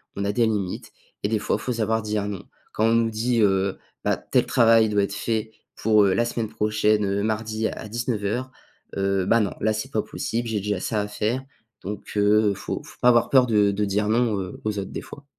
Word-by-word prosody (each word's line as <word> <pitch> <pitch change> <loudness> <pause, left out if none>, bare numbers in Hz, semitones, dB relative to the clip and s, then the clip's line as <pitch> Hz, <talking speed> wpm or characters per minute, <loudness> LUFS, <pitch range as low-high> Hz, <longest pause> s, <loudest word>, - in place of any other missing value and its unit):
qu'on 100 - -2
a 100 - +1
des 115 +1 +2
limites 100 -4 -3 0.3
et - - 0
des 110 - +1
fois, 105 - 0
il - - -10
faut 125 - -2
savoir 110 -1 0
dire 105 -1 -2
non. 100 -3 -5 0.3
Quand 110 - +1
on 115 +1 +4
nous 115 -1 +2
dit 115 +2 +1
heu: 95 -1 +2 0.3
«Bah, - - +1
tel - - +1
travail 115 -2 +5
doit 105 -1 +2
être 100 - -3
fait 110 +1 -2 0.2
pour, 110 -1 +4
heu, 95 - +3
la 120 - +2
semaine 115 -2 -3
prochaine, 105 -1 +1
heu, 100 +1 0
mardi 110 0 -1
à 110 - -6
19:00», 120 +1 -2 0.5
heu: 95 -1 +1
«Ben, 115 - +4
non, 100 -3 0
là, 110 - +2
c'est 110 0 -4
pas - - +1
possible, 115 +1 -3
j'ai 110 -2 -1
déjà 105 -1 -1
ça 105 +3 -1
à 105 - -3
faire». 110 +5 -2 0.4
Donc 100 +2 -6
heu, 105 0 +4
faut - - -5
faut - - -15
pas 125 - +6
avoir 120 -1 +4
peur 130 -2 +6
de 105 -4 +3
de 100 +1 -1
dire 105 +1 0
non, 110 -2 +2
heu, 95 -1 -7
aux 105 -1 -2
autres, 95 - -6
des - - -5
fois. 140 - -12
110 Hz, 235 wpm, -24 LUFS, 100-115 Hz, 0.5 s, pas